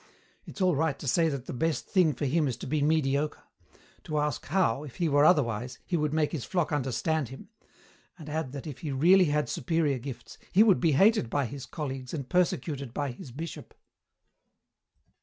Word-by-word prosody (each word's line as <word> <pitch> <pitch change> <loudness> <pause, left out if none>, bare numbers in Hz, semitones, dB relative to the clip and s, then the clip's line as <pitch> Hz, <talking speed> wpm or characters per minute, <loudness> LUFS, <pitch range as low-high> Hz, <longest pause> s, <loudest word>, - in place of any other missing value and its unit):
It's 205 - -8
all 180 -3 +3
right 155 -1 0
to 145 - -8
say 165 +5 +3
that 140 -4 -4
the - - -6
best 160 +5 -1
thing 180 -6 +3
for 145 - -3
him 150 +2 +1
is 125 - -3
to - - -7
be 150 +2 -1
mediocre; 150 -1 +1 0.6
to 155 - -2
ask 150 -3 -1
how, 160 -9 +1
if 140 -5 -10
he 170 - 0
were 145 -1 +4
otherwise, 125 -7 +2
he 180 - -1
would 150 -2 0
make 155 -1 +1
his 150 -8 -4
flock 175 -5 -1
understand 145 +1 -1
him; 135 0 -11 0.7
and 155 - -11
add 155 -3 -3
that 140 - -7
if 150 -5 -7
he 150 - -4
really 180 +8 +5
had 150 -1 0
superior 160 -6 0
gifts 130 0 -9
he 205 - +6
would 205 -5 +4
be 165 -4 +2
hated 195 - +4
by 140 +2 0
his 135 +2 -7
colleagues 135 -3 -5
and 140 -4 -6
persecuted 150 -7 -1
by 145 -2 -1
his 120 - -10
bishop." 160 +6 -8
150 Hz, 195 wpm, -28 LUFS, 135-165 Hz, 0.7 s, he